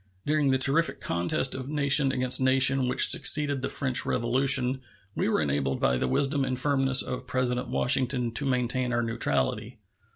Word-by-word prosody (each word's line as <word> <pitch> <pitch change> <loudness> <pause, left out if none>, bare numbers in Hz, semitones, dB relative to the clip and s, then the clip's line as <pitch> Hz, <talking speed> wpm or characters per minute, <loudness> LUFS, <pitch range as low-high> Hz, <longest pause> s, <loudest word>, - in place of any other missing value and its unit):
During 150 -1 0
the 130 - +1
terrific 140 +5 +1
contest 85 +10 -1
of 130 +1 -7
nation 140 -2 +2
against 130 0 +1
nation 130 0 +3
which 125 - +2
succeeded 145 -2 +2
the - - -4
French 130 -3 -1
Revolution 130 +2 +1 0.3
we - - -1
were 110 - 0
enabled 70 -2 -2
by 65 - 0
the 65 - -2
wisdom 140 - -1
and 130 -1 -3
firmness 135 -1 +2
of 125 0 -7
President 125 0 -3
Washington 125 0 0
to 140 +5 -2
maintain 125 -1 -2
our 120 0 -1
neutrality. 115 0 -3
130 Hz, 165 wpm, -26 LUFS, 120-135 Hz, 0.3 s, nation